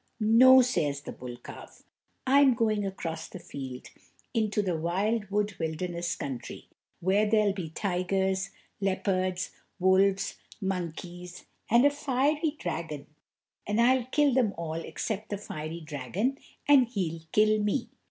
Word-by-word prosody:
"No," 255 +4 +7
says 150 - 0
the - - -7
bull 125 -1 -8
calf, 120 - -12 0.4
"I'm 270 -1 +5
going 215 -3 +1
across 165 -4 -5
the - - -9
field, 130 -7 -8 0.5
into 215 -2 +1
the 180 -3 0
wild 195 +6 -1
wood 205 0 0
wilderness 170 +2 -2
country, 130 -4 -6 0.3
where 200 +4 +2
there'll 210 -2 +3
be 180 -5 -5
tigers, 190 +1 -1 0.3
leopards, 185 -2 0 0.3
wolves, 190 +1 +3 0.2
monkeys, 180 -2 -5 0.2
and 235 +4 +5
a 285 - +6
fiery 290 +2 0
dragon, 160 - -4 0.6
and 210 +2 0
I'll 250 +1 +4
kill 285 +1 +2
them 240 -5 +2
all 165 -2 -4
except 210 +6 -4
the 205 - -2
fiery 165 -4 -6
dragon, 160 - -2 0.3
and 275 -4 +6
he'll 180 -8 -3
kill 215 0 +4
me." 210 +5 -1
195 Hz, 135 wpm, -28 LUFS, 170-225 Hz, 0.6 s, No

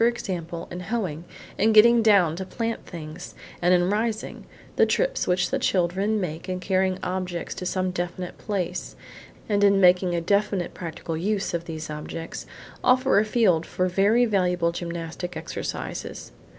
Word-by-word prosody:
example, 175 -8 -2
in 175 - -5
hoeing, 180 -6 -3 0.4
in 220 - +4
getting 235 +2 +7
down 200 -7 +4
to 190 - -4
plant 230 +4 -4
things, 160 -1 -8 0.3
and 175 +1 +3
in 175 -1 +4
rising; 220 +1 -2 0.3
the - - +4
trips - - +1
which 180 0 +1
children 195 +1 +1
make 170 -1 -4
in 185 0 -2
carrying 185 0 +1
objects 180 -2 -3
to 180 - -5
some 185 0 -1
definite 175 0 -4
place, 195 -5 -3 0.5
and 205 -1 +2
in 200 -1 +5
making 180 -1 +4
a - - +1
definite 200 +1 0
practical 165 -1 -5
use 195 +4 -1
of 170 0 -2
these 160 -2 -6
objects, 155 +2 -6 0.4
offer 255 -3 +4
a - - +3
field 215 -7 +2
for 185 - -1
very 205 +6 +3
valuable 180 -5 +1
gymnastic 170 +1 -5
exercises. - - -5
185 Hz, 150 wpm, -25 LUFS, 170-210 Hz, 0.5 s, getting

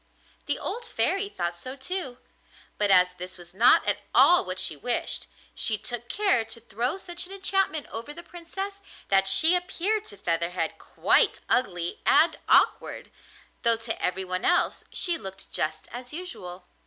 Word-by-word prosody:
The - - 0
old 480 - -4
Fairy 400 -3 0
thought 175 - -3
so 255 +10 -8
too, 280 -3 -5 0.6
but 205 -1 +2
as 180 -1 +5
this 180 +1 -9
was 175 0 -13
not 225 +6 +5
at - - +1 0.2
all 355 - +7
what 185 -1 -5
she 160 - 0
wished, 235 - 0 0.3
she 220 - +1
took 240 +2 -5
care 395 - +2
to 225 +1 -6
throw 235 - -2
such 350 -2 -3
an - - -14
enchantment 390 -5 +1
over 230 +6 -5
the 345 +3 -8
Princess 385 +4 -7 0.3
that 195 0 +3
she 320 - +5
appeared 375 +4 0
to 205 - -8
Featherhead 170 -1 -2
quite - - +3
ugly 175 -8 -1
and 325 - +4
awkward, - - +2 0.5
though 230 -1 +3
to 225 0 -5
every 185 +1 -1
one 185 0 -3
else 355 - +2
she 345 -2 -1
looked 190 0 -9
just 155 0 -2
as 245 +1 -7
usual. 185 - -7
235 Hz, 165 wpm, -26 LUFS, -, 0.6 s, all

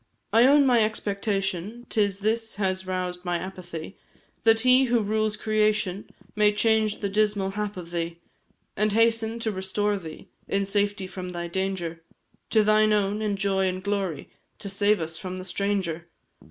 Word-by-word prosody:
I 230 +3 +7
own 285 +1 +6
my 240 -4 +5
expectation, 200 0 -2
'Tis 200 -2 +1
this 225 +2 -1
has 190 -2 -1
roused 180 -1 -3
my 175 -1 0
apathy, 175 -1 -7 0.5
That 225 0 +5
He 255 +2 +5
who 240 -1 +2
rules 215 0 0
creation 215 -3 0 0.3
May 210 0 +4
change 220 0 +2
the 200 - 0
dismal 205 -1 +1
hap 210 0 -4
of 170 -2 -8
thee, 170 -1 -3 0.6
And 210 0 +1
hasten 225 0 +2
to 220 - 0
restore 200 +1 -1
thee 160 -3 -10 0.2
In 200 0 0
safety 205 0 0
from 185 -1 -6
thy 175 -1 -4
danger, 175 -2 -3 0.5
To 220 -2 +4
thine 215 0 +4
own, 205 0 +1
in 210 -2 0
joy 195 -1 +1
and 185 0 -3
glory, 195 -5 -2 0.3
To 200 - -5
save 205 +2 +2
us 160 0 -4
from 185 -2 -5
the 185 - -7
stranger. 185 -3 -2
200 Hz, 165 wpm, -26 LUFS, 185-215 Hz, 0.6 s, I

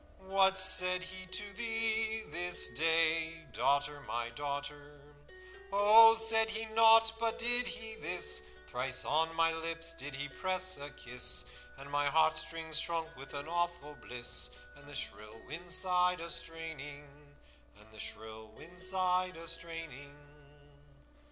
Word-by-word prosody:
What 190 0 +3
said 185 -1 +4
he 185 0 -9
to 205 +2 -3
thee 225 0 -1
this 175 +3 +1
day, 165 0 +1
Daughter, 145 +1 0
my 120 0 -3
daughter?' 145 +2 -6 0.7
'Oh, 220 +3 +7
said 225 0 +5
he 220 0 -2
nought, 225 0 +6
but 230 -1 -1
did 245 +1 +4
he 225 -2 -4
this: 75 -4 +1 0.2
Thrice 125 - -2
on 160 +2 +1
my 165 0 +3
lips 165 0 -2
did 145 -4 -7
he 140 +2 -4
press 185 +5 0
a 145 +1 -7
kiss, 125 -3 -2 0.3
And 140 +1 -11
my 145 0 +1
heartstrings 160 +1 +1
shrunk 165 -1 -4
with 135 +1 -11
an 140 +2 -5
awful 175 -3 -3
bliss, 125 -3 -3 0.3
And 145 0 -16
the 145 - -10
shrill 105 +1 -7
wind 170 +5 -8
sighed 180 0 +2
a 170 0 -4
straining.' 145 -3 -6
165 Hz, 120 wpm, -33 LUFS, 145-190 Hz, 0.7 s, Oh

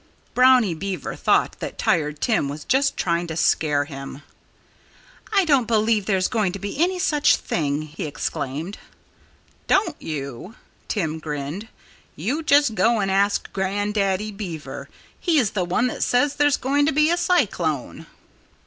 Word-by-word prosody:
Brownie 250 -6 +5
Beaver 190 +3 -4
thought - - +1
that - - -6
Tired 150 -3 0
Tim 220 - +1
was 145 +2 -6
just 270 +2 +1
trying 170 0 0
to 160 -1 -5
scare 145 -3 +2
him. 135 -1 -9 1.1
"I 395 -3 +3
don't 275 -7 +3
believe 220 -2 +2
there's 190 -3 +2
going 210 -6 0
to - - -4
be 200 +9 -4
any 370 +1 0
such 300 -5 +3
thing!" 145 -1 -2
he 155 +3 -6
exclaimed. 150 +4 -4 0.9
"Don't 365 -6 +1
you?" 145 - -6 0.3
Tim 160 -6 -2
grinned. 150 +6 -5 0.5
"You 295 +6 -2
just 290 -6 +4
go 230 +1 +2
and 195 -1 0
ask 200 +1 +1
Grandaddy 200 +1 -1
Beaver. 180 -7 -7 0.3
He's 300 - +2
the 185 -3 -1
one 185 +7 +1
that 250 - -3
says 260 +3 +2
there's 290 -1 +3
going 285 +2 +1
to - - +3
be 305 +3 +3
a - - +3
cyclone." 185 - 0
200 Hz, 150 wpm, -23 LUFS, 160-260 Hz, 1.1 s, Brownie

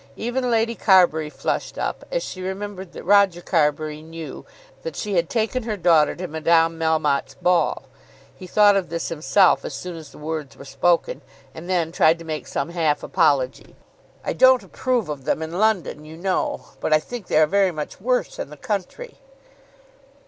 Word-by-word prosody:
Even 245 +2 -2
Lady 230 0 +1
Carbury 175 -8 +4
flushed - - -3
up, - - -3
as - - -1
she 185 - -7
remembered 190 -1 -5
that - - -9
Roger 200 -2 +4
Carbury 155 -3 0
knew 160 0 -9 0.3
that 485 - -6
she 210 -2 -3
had 170 -2 +1
taken 230 +2 -1
her 220 -2 -3
daughter 165 -4 +4
to 180 +1 -5
Madame 165 +1 +2
Melmotte's 155 -3 0
ball. 180 -5 +1 0.5
He 185 - -11
thought 205 +2 +5
of 195 -2 -1
this 170 0 -3
himself 170 +4 +3
as - - -5
soon 180 -1 -6
as 160 -2 -10
the - - -15
words 150 -2 -5
were 140 - -11
spoken, 170 - 0 0.3
and 170 +3 -9
then 170 -3 0
tried 160 0 +4
to 165 - -11
make 155 -1 -5
some 140 +2 -3
half 160 -4 0
apology. 140 -7 0 0.5
"I - - -1
don't 260 -3 +5
approve 240 +2 -1
of 145 -3 -6
them 155 - 0
in 165 +3 -5
London, 200 -9 +1
you 155 +1 -11
know; 185 +2 -2
but - - -2
I 155 - +6
think 225 +5 -8
they - - +1
are 155 - +6
very 195 +4 +2
much 155 +1 -6
worse 250 +3 -1
in - - -4
the 150 - -11
country." 210 - -5
170 Hz, 185 wpm, -22 LUFS, 155-205 Hz, 0.5 s, I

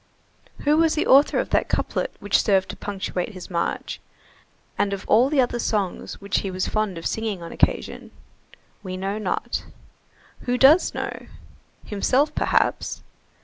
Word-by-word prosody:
Who 295 +1 +3
was 325 -1 +3
the 310 - 0
author 275 +2 +5
of - - -1
that - - +1
couplet - - -1
which - - +2
served 195 -3 +2
to - - -5
punctuate 195 0 -4
his 185 0 -9
march, 170 -1 -2 0.8
and 200 -1 0
of 195 - -6
all 240 +5 +5
the 295 -2 +1
other 245 -1 +1
songs 205 -6 -2
which 200 0 -1
he 195 - -4
was 185 0 -2
fond 215 -4 -1
of 165 - -8
singing 215 -5 -2
on 165 - -8
occasion? - - -1 0.7
We 185 -2 -6
know 195 +3 -3
not. 195 -4 -2 0.8
Who 245 0 +1
does 290 +8 +5
know? - - -5 0.6
Himself, 255 +8 +1
perhaps. - - 0
210 Hz, 155 wpm, -23 LUFS, 190-255 Hz, 0.8 s, author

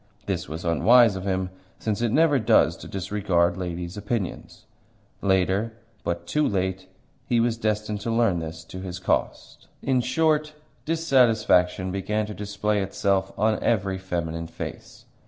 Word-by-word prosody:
This - - -3
was 80 +3 -6
unwise 110 +6 +5
of 95 0 -5
him, 95 -1 -1 0.3
since 110 0 -2
it 120 -2 +1
never 150 0 +4
does 110 - +4
to - - -10
disregard 95 -3 0
ladies' 90 0 -5
opinions. 105 -1 -4 0.6
Later 95 +3 +1 0.3
but 85 0 -3
too 150 -1 +1
late 95 -1 -2 0.4
he 120 -2 +2
was 115 0 +2
destined 105 -2 -2
to 115 - -3
learn 115 -6 +2
this 80 0 -6
to 90 +3 -9
his 90 -2 -5
cost. 90 - -2 0.2
In 130 -2 +2
short, 150 +3 +1 0.3
dissatisfaction 115 - +3
began 105 +3 -1
to 105 - -7
display 105 0 -1
itself 95 0 0
on 110 0 +1
every 95 -4 0
feminine 85 -3 -3
face. 85 0 -8
100 Hz, 145 wpm, -25 LUFS, 90-115 Hz, 0.6 s, unwise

